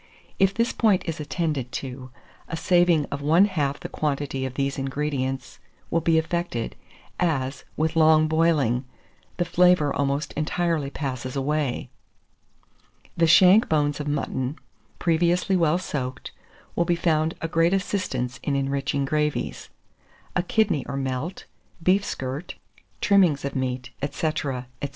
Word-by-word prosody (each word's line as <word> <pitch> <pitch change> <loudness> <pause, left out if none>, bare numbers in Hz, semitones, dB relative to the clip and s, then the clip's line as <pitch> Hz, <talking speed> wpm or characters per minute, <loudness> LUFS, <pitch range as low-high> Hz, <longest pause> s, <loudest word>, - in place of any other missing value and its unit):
If 195 0 +3
this 230 +1 +1
point 210 -5 +3
is 165 -2 -4
attended 150 -5 -2
to, 130 -1 -6 0.4
a 165 - -4
saving 175 -4 +3
of 140 - -3
one 165 +7 +5
half 145 -8 -1
the - - -6
quantity 140 -3 -2
of 130 - -9
these 140 0 -1
ingredients 135 -2 -3 0.3
will 165 - +2
be 165 0 +3
effected, 160 -7 -2 0.4
as, 140 -6 -1
with 160 +1 0
long 155 -1 +5
boiling, 155 -6 +2 0.5
the 175 - +1
flavour 180 -3 +4
almost 140 +1 -1
entirely 155 -1 -1
passes 130 -3 -4
away. 140 -1 -1 1.2
The 165 0 +3
shank 185 +7 +6
bones 145 -2 +1
of 150 - -4
mutton, 135 -1 -2 0.4
previously 175 +3 +2
well 170 -2 +3
soaked, 135 -8 -4 0.4
will 170 - +2
be 175 0 +2
found 160 -2 +1
a 165 - -2
great 165 +1 +2
assistance 185 -10 -2
in 140 - -1
enriching 140 0 -1
gravies; 150 +1 -1 0.7
a 180 - +3
kidney 190 - +1
or 135 - -4
melt, 135 +6 -3 0.4
beef 190 +3 +4
skirt, 135 0 -5 0.5
trimmings 180 -9 +4
of 140 - -4
meat, 125 -1 -2
&c. 155 +2 -1
&c. 130 -3 -2
150 Hz, 135 wpm, -25 LUFS, 135-170 Hz, 1.2 s, shank